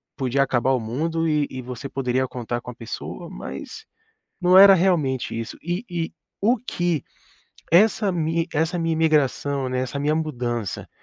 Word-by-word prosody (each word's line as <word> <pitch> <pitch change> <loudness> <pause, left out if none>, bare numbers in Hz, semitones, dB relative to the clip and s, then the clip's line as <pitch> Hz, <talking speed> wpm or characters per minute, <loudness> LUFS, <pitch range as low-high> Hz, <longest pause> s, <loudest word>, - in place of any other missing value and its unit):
podia 135 -1 0
acabar 130 -1 +2
o 130 - +1
mundo 160 +9 -1
e 150 -2 +2
e 130 - -5
você 125 +2 -7
poderia 130 -1 0
contar 120 -1 -4
com 125 - -8
a - - -14
pessoa, 115 -2 -7
mas 440 - -8 0.5
não 180 0 +5
era 195 0 +10
realmente 155 -11 +1
isso. 115 0 -5
E 175 +5 -3
e 170 -2 -3 0.3
o 230 +5 +3
que 175 - -2 0.7
essa 210 +3 +4
mi 165 -1 0
essa 160 +3 0
minha 165 -1 0
imigração, 145 -4 +1
né, 125 0 -1
essa 130 +2 -3
minha 150 +2 +1
mudança, 120 - -3
150 Hz, 165 wpm, -23 LUFS, 125-170 Hz, 0.7 s, era